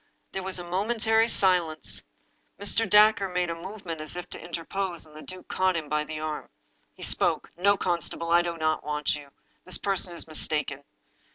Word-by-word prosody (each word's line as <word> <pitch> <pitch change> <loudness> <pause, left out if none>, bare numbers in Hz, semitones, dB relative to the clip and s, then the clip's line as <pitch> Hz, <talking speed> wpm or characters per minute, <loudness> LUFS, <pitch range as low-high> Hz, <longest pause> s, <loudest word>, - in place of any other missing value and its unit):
There 190 - -3
was 190 0 0
a 175 - -4
momentary 220 +4 +2
silence. 180 -7 +1 0.6
Mr. 215 +3 +2
Dacre 210 -1 +6
made 180 -1 0
a - - -3
move 190 +4 -9
ment 165 -2 -4
as 155 +1 -3
if 180 - -5
to - - -7
interpose. 175 +1 -3
The 155 0 -11
duke 185 +2 -9
caught 185 -2 +1
him 155 -3 -5
by 150 0 0
the 155 0 -5
arm. 155 -1 -4 0.5
He - - -10
spoke: - - +2
"No, 200 +4 +3
constable, 170 -2 -1
I 170 0 +7
do 170 -1 -3
not 155 -1 0
want 150 -1 0
you. 145 -1 -10 0.3
This 185 - +2
person 190 -3 +1
is - - +1
mistaken." 150 -2 -1
175 Hz, 185 wpm, -27 LUFS, 155-195 Hz, 0.6 s, I